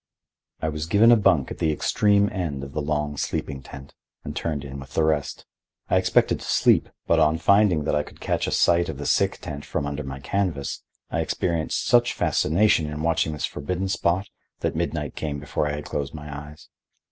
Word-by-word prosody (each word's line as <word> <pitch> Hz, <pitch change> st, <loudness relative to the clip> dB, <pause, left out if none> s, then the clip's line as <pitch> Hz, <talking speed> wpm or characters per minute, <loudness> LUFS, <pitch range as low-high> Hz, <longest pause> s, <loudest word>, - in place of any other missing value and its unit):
I 80 Hz, -, +1 dB
was 75 Hz, 0 st, -4 dB
given 105 Hz, +6 st, +6 dB
a -, -, +9 dB
bunk 95 Hz, -, +2 dB
at -, -, -7 dB
the 80 Hz, -, +2 dB
extreme 100 Hz, +6 st, +2 dB
end 80 Hz, -8 st, -3 dB
of 70 Hz, -, -7 dB
the 75 Hz, -, -1 dB
long 75 Hz, 0 st, -2 dB
sleeping 70 Hz, 0 st, -3 dB
tent, 70 Hz, +1 st, -11 dB, 0.3 s
and -, -, -6 dB
turned 75 Hz, -4 st, -3 dB
in 70 Hz, 0 st, -7 dB
with 65 Hz, -2 st, -11 dB
the 80 Hz, -, +3 dB
rest. 75 Hz, -2 st, -1 dB, 0.5 s
I -, -, +5 dB
expected 90 Hz, -1 st, +2 dB
to -, -, -9 dB
sleep, -, -, +3 dB, 0.2 s
but 85 Hz, -, +3 dB
on 80 Hz, 0 st, +3 dB
finding 95 Hz, -2 st, +4 dB
that 80 Hz, -, -1 dB
I 75 Hz, -, +2 dB
could 75 Hz, -, -13 dB
catch -, -, -1 dB
a -, -, -2 dB
sight 85 Hz, 0 st, +3 dB
of 75 Hz, -, -5 dB
the 75 Hz, -, -6 dB
sick -, -, +2 dB
tent 75 Hz, -1 st, -6 dB
from -, -, -3 dB
under 70 Hz, +1 st, -3 dB
the 65 Hz, -1 st, -6 dB
canvas, 80 Hz, -3 st, -2 dB, 0.3 s
I -, -, -1 dB
experienced 85 Hz, -3 st, -1 dB
such 120 Hz, 0 st, +4 dB
fascination 85 Hz, 0 st, +2 dB
in 75 Hz, +1 st, -5 dB
watching 80 Hz, -1 st, +1 dB
this 75 Hz, -, -2 dB
forbidden 90 Hz, +6 st, -3 dB
spot 95 Hz, 0 st, 0 dB, 0.3 s
that -, -, -1 dB
midnight -, -, -2 dB
came 75 Hz, -2 st, -3 dB
before 75 Hz, +1 st, -2 dB
I 75 Hz, -, -2 dB
had 75 Hz, 0 st, -5 dB
closed 70 Hz, +1 st, -4 dB
my 75 Hz, -1 st, -7 dB
eyes. 75 Hz, -, -16 dB
75 Hz, 205 wpm, -24 LUFS, 75-90 Hz, 0.5 s, a